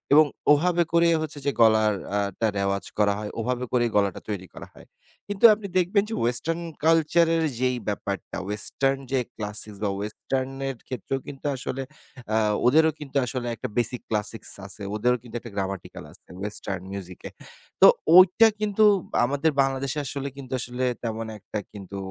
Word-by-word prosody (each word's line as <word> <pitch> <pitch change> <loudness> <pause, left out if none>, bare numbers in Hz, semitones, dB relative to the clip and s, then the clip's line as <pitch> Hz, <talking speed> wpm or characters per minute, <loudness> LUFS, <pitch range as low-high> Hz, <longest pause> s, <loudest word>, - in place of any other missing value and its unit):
এবং 155 +1 +8 0.3
ওভাবে 175 +3 +2
করেই 170 0 +5
হচ্ছে 150 -2 -5
যে 140 - +2
গলাটা 110 -3 +4
আ - - +2 0.2
টা 115 - +2
রেওয়াজ 100 0 -1
করা 100 -1 +4
হয়, 105 -1 -5
ওভাবে 125 +2 -1
করেই 120 -2 +2
গলাটা 100 -2 +1
তৈরি 95 -3 -4
করা - - -10
হয়। - - -16 0.4
কিন্তু 205 +1 +2
আপনি 205 -1 -5
দেখবেন 185 +3 +3
যে - - -4
western 160 +8 -1 0.2
culture 165 +1 +4
এর 165 - +1 0.2
যেই 125 0 +1
ব্যাপারটা, 100 -2 -4
western 135 +6 0
যে 135 - +2 0.2
classic 105 0 -4
বা 105 - +1
western 130 +5 -3 0.2
এর 135 - -5
ক্ষেত্রেও 130 +2 -3
কিন্তু 140 0 -10
আসলে 130 +1 -4 0.5
আ - - +4 0.3
ওদেরও 160 +5 +5
কিন্তু 140 -1 -4
আসলে 125 0 -3
একটা - - -5
basic 120 0 0
classics 110 +1 -1
আছে। 100 +1 -5
ওদেরও 125 +3 +2
কিন্তু 120 -1 -12
একটা 115 -2 -11
grammatical 95 -2 -4
আছে - - -15 0.2
western 100 -3 -3
music 95 -2 -6
এ। - - -7 0.5
তো - - +11 0.3
ঐটা 185 +5 +7
কিন্তু 215 0 +1 0.4
আমাদের 145 +5 +1
বাংলাদেশে 135 +1 -1
আসলে 140 +1 -4
কিন্তু 130 -2 -8
আসলে 125 +1 -4 0.2
তেমন 115 -1 -3
একটা 105 +2 -5
কিন্তু 100 -1 -8
125 Hz, 170 wpm, -25 LUFS, 105-150 Hz, 0.5 s, তো